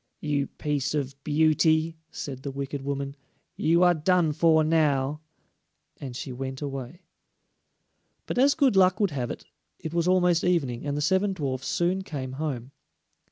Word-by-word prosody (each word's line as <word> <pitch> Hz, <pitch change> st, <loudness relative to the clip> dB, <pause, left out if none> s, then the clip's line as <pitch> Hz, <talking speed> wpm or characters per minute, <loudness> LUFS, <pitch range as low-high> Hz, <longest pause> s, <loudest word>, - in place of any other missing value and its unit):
"You 145 Hz, -2 st, -1 dB
piece 145 Hz, -1 st, -2 dB
of 140 Hz, -2 st, -2 dB
beauty," 160 Hz, +1 st, +2 dB
said 130 Hz, -3 st, -6 dB
the 140 Hz, -, -5 dB
wicked 140 Hz, +1 st, -4 dB
woman, 140 Hz, 0 st, -3 dB, 0.4 s
"you 170 Hz, +3 st, +3 dB
are 175 Hz, 0 st, +6 dB
done 170 Hz, 0 st, +2 dB
for 160 Hz, 0 st, +4 dB
now," 150 Hz, -2 st, +1 dB, 0.8 s
and 130 Hz, -3 st, -7 dB
she 130 Hz, +1 st, -5 dB
went 130 Hz, +1 st, -5 dB
away. 135 Hz, +3 st, -6 dB, 1.2 s
But -, -, -2 dB
as 280 Hz, +2 st, +5 dB
good 275 Hz, -8 st, +3 dB
luck 185 Hz, 0 st, +4 dB
would 200 Hz, -5 st, +2 dB
have 125 Hz, -4 st, -3 dB
it, -, -, -7 dB, 0.3 s
it 160 Hz, -, -7 dB
was 170 Hz, 0 st, +1 dB
almost 180 Hz, -2 st, +3 dB
evening, 145 Hz, -8 st, 0 dB
and 145 Hz, 0 st, -1 dB
the -, -, -1 dB
seven 190 Hz, +5 st, +2 dB
dwarfs 130 Hz, -6 st, -3 dB
soon 180 Hz, +2 st, 0 dB
came 135 Hz, -8 st, -5 dB
home. 135 Hz, -3 st, -4 dB
150 Hz, 160 wpm, -26 LUFS, 135-175 Hz, 1.2 s, are